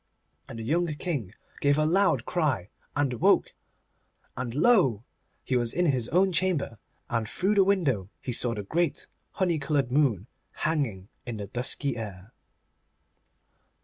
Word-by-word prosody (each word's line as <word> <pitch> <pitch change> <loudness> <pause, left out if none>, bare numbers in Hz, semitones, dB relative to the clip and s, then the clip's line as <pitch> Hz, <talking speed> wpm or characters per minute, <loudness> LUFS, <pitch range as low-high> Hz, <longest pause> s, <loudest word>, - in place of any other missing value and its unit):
And - - -7
the 115 - -5
young 170 +9 +1
King 135 - -3 0.2
gave 145 0 +3
a 155 - +3
loud 195 +5 +3
cry 140 - 0 0.3
and 145 -3 +1
woke, - - +4 0.8
and 120 -1 -4
lo! 145 - +4 0.4
he 130 - -1
was 120 -2 0
in 180 - +1
his 130 -7 +1
own 190 +3 +3
chamber, 170 - 0 0.3
and 115 -3 -1
through 195 +3 +1
the 200 -2 +5
window 150 - +1
he 125 - -4
saw 120 0 0
the 105 - -4
great 165 - -1 0.3
honey 175 -4 +1
coloured 140 -3 0
moon 125 - +2 0.4
hanging 125 - -1 0.2
in 120 -2 -4
the 100 - -5
dusky 125 +4 -2
air. 100 -1 -8
135 Hz, 145 wpm, -27 LUFS, 115-170 Hz, 0.8 s, the